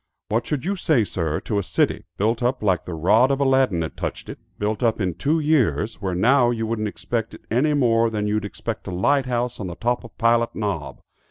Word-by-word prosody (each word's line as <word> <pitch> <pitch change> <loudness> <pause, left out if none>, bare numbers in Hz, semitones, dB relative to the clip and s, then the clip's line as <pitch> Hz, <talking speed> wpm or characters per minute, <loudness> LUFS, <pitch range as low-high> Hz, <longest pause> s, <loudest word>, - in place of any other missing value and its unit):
What 115 +2 0
should 145 -4 -2
you 200 +2 0
say, 155 - +2
sir, 80 -5 -2
to 105 - -1
a - - -2
city, - - 0
built 115 +4 +1
up 125 -1 0
like 95 -4 +1
the 90 - -5
rod 95 +11 +4
of 140 0 0
Aladdin 130 -10 +2
had 80 - -6
touched - - -5
it, - - -8 0.2
built 105 +2 -2
up 115 -2 +1
in 95 -4 0
two 145 - 0
years, 145 -8 +1
where 95 -3 -2
now 120 +6 +4
you 115 -2 -1
wouldn't 110 -1 -2
expect 105 +5 -4
it - - -16
any 145 +6 +2
more 115 -4 +3
than 105 -2 -2
you'd 105 0 0
expect 110 +2 -5
a - - -3
light 130 +9 +1
house 125 0 -2
on 100 - -4
the 85 - -6
top 120 +4 -1
of 115 - -13
Pilot 115 0 +2
Knob? 95 -10 -3
115 Hz, 230 wpm, -23 LUFS, 100-125 Hz, 0.2 s, rod